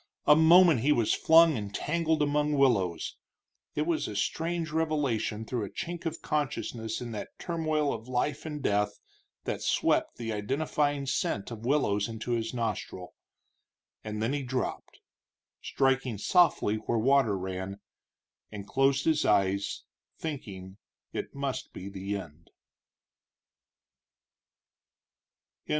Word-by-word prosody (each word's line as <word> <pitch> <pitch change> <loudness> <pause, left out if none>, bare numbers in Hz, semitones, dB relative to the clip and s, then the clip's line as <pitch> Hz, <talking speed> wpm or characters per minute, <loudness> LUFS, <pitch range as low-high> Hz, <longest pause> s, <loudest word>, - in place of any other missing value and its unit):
A 150 - +7
moment 165 -2 +7
he 140 +6 +2
was 120 -7 +3
flung 165 -1 +6
and 105 -3 -4
tangled 160 -1 +1
among 150 +1 +1
willows 105 - +1 0.6
it 150 - +1
was 170 -1 0
a 105 - -6
strange 165 +9 -1
revelation 145 -9 -1
through 120 -1 -2
a 100 - -5
chink 170 0 -5
of 165 +1 -5
consciousness 125 -7 -2
in 120 -1 -5
that 105 - -7
turmoil 155 -4 -1
of 115 +1 -7
life 135 +4 -1
and 150 -2 -6
death 105 0 +1 0.5
that - - -3
swept - - +1
the 115 -2 -3
identifying 145 +5 -1
scent 115 -5 -1
of 115 0 -6
willows 105 -8 +2
into 115 +1 -5
his 115 -1 -1
nostrils 110 -6 -4 0.9
and 105 0 -4
then 120 +5 0
he 145 - -1
dropped, 130 -1 -4 0.6
striking 135 -4 0
softly 110 - +3
where 115 +2 -2
water 125 -3 +3
ran, 95 +1 -5 0.7
and 100 -2 -7
closed 135 0 +2
his 160 -2 +3
eyes, 100 -1 +1 0.3
thinking 100 - -6 0.4
it - - -5
must 140 -1 -4
be 95 - -7
the 100 +1 -4
end. 85 -3 -11
125 Hz, 130 wpm, -29 LUFS, 105-150 Hz, 0.9 s, A